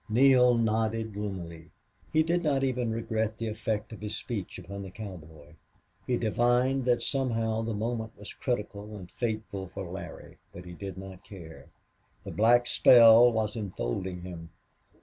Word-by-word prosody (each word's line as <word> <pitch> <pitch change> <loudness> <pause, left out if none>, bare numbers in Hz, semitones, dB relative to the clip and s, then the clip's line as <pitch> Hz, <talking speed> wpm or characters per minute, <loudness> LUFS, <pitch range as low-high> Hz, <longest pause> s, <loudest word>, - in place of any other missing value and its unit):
Neale 125 +1 +5
nodded 110 -1 0
gloomily. 85 -6 -6 0.4
He 155 - +4
did 170 +2 +1
not 140 -5 +1
even 125 -3 0
regret 110 -1 -2
the 115 - -3
effect 110 0 -3
of 110 - -10
his 105 0 -4
speech 105 -7 -5
upon 100 0 -8
the 95 - -7
cowboy. 80 -7 -10 0.5
He 125 - +1
divined 120 +4 +1
that 120 -2 +2
somehow 115 -4 0
the 115 -1 -3
moment 110 +1 -3
was 105 - -9
as - - -8
critical 105 -3 -4
and 90 -3 -10
fateful 110 -5 -4
for 95 +1 -7
Larry, 95 +3 -9
but 90 - -11
he 90 - -9
did 95 +1 -7
not 95 -1 -10
care. 85 -5 -12 0.6
The - - -7
black 120 +3 +4
spell 120 0 +7
was 110 -1 -1
enfolding 90 - -4
him. 85 -2 -8
110 Hz, 160 wpm, -28 LUFS, 95-120 Hz, 0.6 s, spell